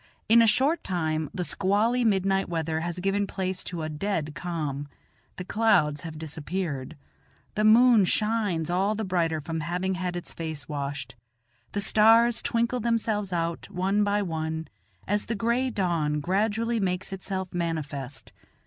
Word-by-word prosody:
In 230 +1 +7
a 230 - +5
short 285 +9 +2
time 160 -4 -1
the 180 - -3
squally 210 +7 +1
midnight 195 -3 +2
weather 160 -1 -1
has 170 +1 -3
given 195 +2 0
place 185 -1 -3
to 170 -3 -4
a - - -2
dead 155 -1 -2
calm; 150 -5 -4 0.5
the 180 - -6
clouds 165 -10 +2
have 160 -2 -7
dispersed; 155 -2 -4 0.6
the 215 - 0
moon 225 -1 +6
shines 205 -6 0
all 195 +4 +1
the 220 - -3
brighter 170 -4 0
from 160 +2 -4
having 180 +4 -1
had 180 -1 -3
its 175 - -6
face 155 -5 -5
washed; 145 -1 -4 0.6
the 205 - -1
stars 225 +3 +5
twinkle 235 +2 0
themselves 220 -4 0
out 170 -1 -2
one 195 +3 +1
by 205 0 +1
one 160 -2 -3 0.4
as 205 +1 +1
the 230 - -1
gray 235 +5 +1
dawn 170 -8 0
gradually 220 +7 0
makes 185 -1 -2
itself 190 -1 -4
manifest. 150 -6 -4
185 Hz, 150 wpm, -27 LUFS, 160-210 Hz, 0.6 s, In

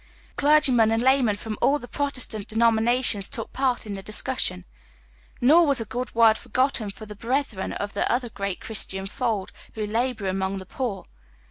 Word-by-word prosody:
Clergymen 285 -6 +4
and 225 +1 +1
laymen 260 -5 +3
from 215 +1 -6
all 285 - +4
the 245 -4 -10
Protestant 255 -7 -2
denominations 225 -1 +2
took 225 - -3
part 260 -3 0
in 210 - -5
the 195 - -6
discussion; 215 - -2 0.7
nor 310 +8 +6
was 280 -3 +4
a 225 - -3
good 245 +3 -5
word 225 -1 +5
forgotten 255 -5 0
for 200 +2 -8
the 210 0 -10
brethren 230 -2 -2
of 205 0 -4
the 200 - 0
other 245 0 0
great 200 -2 -4
Christian 195 -3 -3
fold 210 -2 -2 0.2
who 215 -1 -2
labor 225 0 -1
among 190 +1 -1
tlie 190 -1 -9
poor. 245 -7 -4
225 Hz, 170 wpm, -24 LUFS, 205-255 Hz, 0.7 s, nor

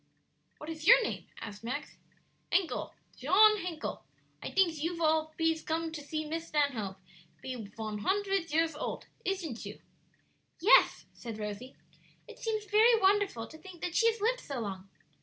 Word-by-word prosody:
"What 300 - -10
is 315 +1 -6
your - - +9
name?" - - -4
asked 210 0 -8
Max. 255 +6 -5 0.5
"Hencle 375 -3 0 0.2
Shon 425 +2 +5
Hencle. 350 -5 -5 0.4
I - - -4
dinks 345 -5 +2
you 335 +2 -2
all 315 0 +2
pees 325 -1 +1
come 325 0 -2
to 310 -2 -6
see 310 +2 -4
Miss 325 +2 -4
Stanhope 255 -12 0 0.5
pe 260 - -4
von 215 -2 -6
huntred 390 - 0
years 325 +1 +2
olt; 295 - -4 0.2
ishn't 340 - -3
you?" - - -8 0.8
"Yes," 400 +8 +5
said 230 -3 -7
Rosie. 210 +5 -6 0.5
"It - - -12
seems 435 -2 -2
very 440 +3 +5
wonderful 390 - +2
to 315 - -13
think 370 -2 -12
that 355 - -3
she 460 - +4
has 450 - -9
lived - - +2
so 275 -4 -5
long." 195 -2 -6
320 Hz, 160 wpm, -31 LUFS, 255-385 Hz, 0.8 s, your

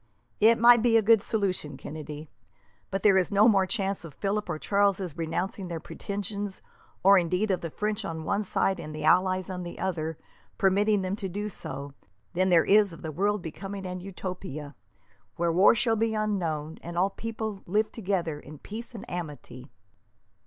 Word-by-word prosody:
"It 225 +2 +6
might 235 0 +7
be 230 -1 +5
a - - +5
good 225 0 +6
solution, 195 -9 -2
Kennedy, 150 0 -8 0.6
but 195 0 -3
there 195 -2 +6
is 180 - -1
no 205 +2 +6
more 195 -4 +4
chance 195 -3 -2
of 155 -5 -10
Philip 205 0 -2
or 155 - -1
Charles 200 +3 +2 0.2
renouncing 175 +3 -3
their 170 -2 -4
pretensions, 200 +2 -5 0.4
or 195 +1 +7
indeed 180 +5 0
of 185 - 0
the 165 - -4
French 210 +5 -2
on 160 -1 -4
one 200 +5 0
side 195 -2 0
and 155 -1 -7
the 155 - -5
allies 185 +3 +3
on 185 -1 -5
the 175 -1 -7
other 165 -4 -2 0.4
permitting 200 +1 +3
them 185 +1 -1
to 195 -3 -4
do 205 +3 -3
so, 140 -6 -7 0.4
than 185 +2 +2
there 170 -3 +5
is 205 -2 +5
of - - -12
the 160 - -4
world 200 +4 0
becoming 195 +4 -6
an 180 0 -4
utopia, 180 -6 -6 0.6
where 170 0 +1
war 185 +7 +6
shall 230 0 +2
be 225 0 0
unknown, 165 -8 -2
and 170 +1 -7
all 190 +3 +2
peoples 220 -1 -5
live 210 +4 +1
together 180 -8 -2
in 150 +1 -11
peace 230 - -8
and 210 - -8
amity." 145 -6 -7
190 Hz, 180 wpm, -28 LUFS, 165-205 Hz, 0.6 s, might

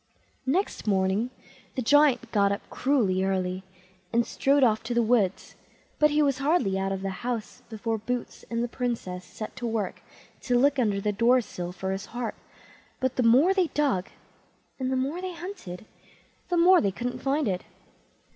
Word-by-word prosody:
Next 350 - 0
morning 195 +3 +1 0.5
the 255 - -1
Giant 265 -3 +4
got 200 -2 +3
up 200 - -4
cruelly 220 -9 +1
early, 185 -1 -1 0.5
and 235 0 +2
strode 275 0 +2
off 220 -3 +3
to 240 +1 -2
the 235 - +4
wood; 220 -5 +3 0.7
but 300 - +6
he 300 0 +3
was 275 -2 +1
hardly 280 - +2
out 195 0 -1
of 195 0 -3
the 195 -1 -4
house 245 0 -4
before 225 0 -2
Boots 245 +3 -4
and 230 0 -1
the - - 0
Princess 230 -8 -3
set 215 +3 -8
to 245 -2 -3
work 220 -4 -2 0.4
to 245 -1 +1
look 280 +2 +3
under 210 -5 +1
the 210 +1 0
door 235 +5 +4
sill 180 -6 -5
for 190 +1 -4
his 195 0 -4
heart; 240 -2 -4 0.7
but 260 -1 0
the - - +1
more 255 +11 +5
they 375 -3 +2
dug, 275 -13 0 0.7
and 260 0 -1
the - - +1
more 280 +7 -2
they 370 -1 -5
hunted, 335 - -8 0.6
the 350 - +1
more 360 +2 +6
they 200 - +1
couldn't 245 +5 -4
find 280 0 +1
it. 185 -2 -1
235 Hz, 180 wpm, -27 LUFS, 200-275 Hz, 0.7 s, but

